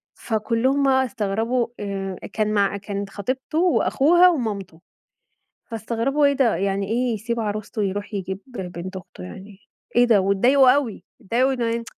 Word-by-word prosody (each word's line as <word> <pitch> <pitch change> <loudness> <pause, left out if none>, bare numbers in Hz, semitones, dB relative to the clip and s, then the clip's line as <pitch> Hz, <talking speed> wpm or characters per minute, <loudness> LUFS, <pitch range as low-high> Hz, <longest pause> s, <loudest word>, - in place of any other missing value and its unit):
فكلهم 235 +5 0
بقى 265 -1 +3
استغربوا 225 +2 -1
آآ، 195 -2 -4 0.2
كان 215 -1 0
مع 200 -1 +1
كانت 200 0 -5
خطيبته 255 +9 -4
وأخوها 350 0 +4
ومامته، 200 - -3 0.8
فاستغربوا 235 +5 -1
إيه 280 - +4
ده 260 -4 +2
يعني 195 0 -1
إيه 240 +2 0
يسيب 230 +2 -3
عروسته 215 0 -3
يروح 205 +2 -3
يجيب 190 -1 -4
بنت 185 -5 -7
أخته 175 - -10
يعني 190 - -11 0.4
إيه 245 - +6
ده 220 -5 +4
واتضايقوا 245 +8 +4
أوي، 260 -5 -1 0.2
اتضايقوا 245 +5 +1
إنه 235 -2 -1
220 Hz, 140 wpm, -22 LUFS, 200-255 Hz, 0.8 s, إيه